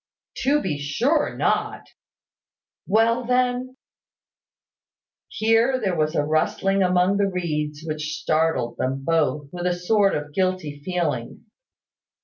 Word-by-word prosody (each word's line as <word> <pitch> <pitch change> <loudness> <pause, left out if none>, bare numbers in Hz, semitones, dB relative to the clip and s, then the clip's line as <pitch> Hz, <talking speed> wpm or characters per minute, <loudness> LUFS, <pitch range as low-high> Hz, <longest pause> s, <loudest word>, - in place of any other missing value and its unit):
"To 285 +3 +2
be 150 -6 -2
sure 240 - 0
not." - - 0 1.0
"Well, 230 +4 +3
then 250 +1 0 0.7
" - - -71
Here 225 +4 +2
there 195 -6 -1
was 155 0 0
a 145 - +2
rustling 195 +5 +1
among 180 +1 +3
the 200 -1 +2
reeds 150 -4 -3
which 155 0 -3
startled 155 -7 0
them 135 +1 -2
both, 150 -3 0
with 180 0 -3
a 180 - +1
sort 195 +3 +2
of 150 0 -5
guilty 185 -5 -1
feeling. 165 - -3
180 Hz, 125 wpm, -23 LUFS, 150-220 Hz, 1.0 s, Well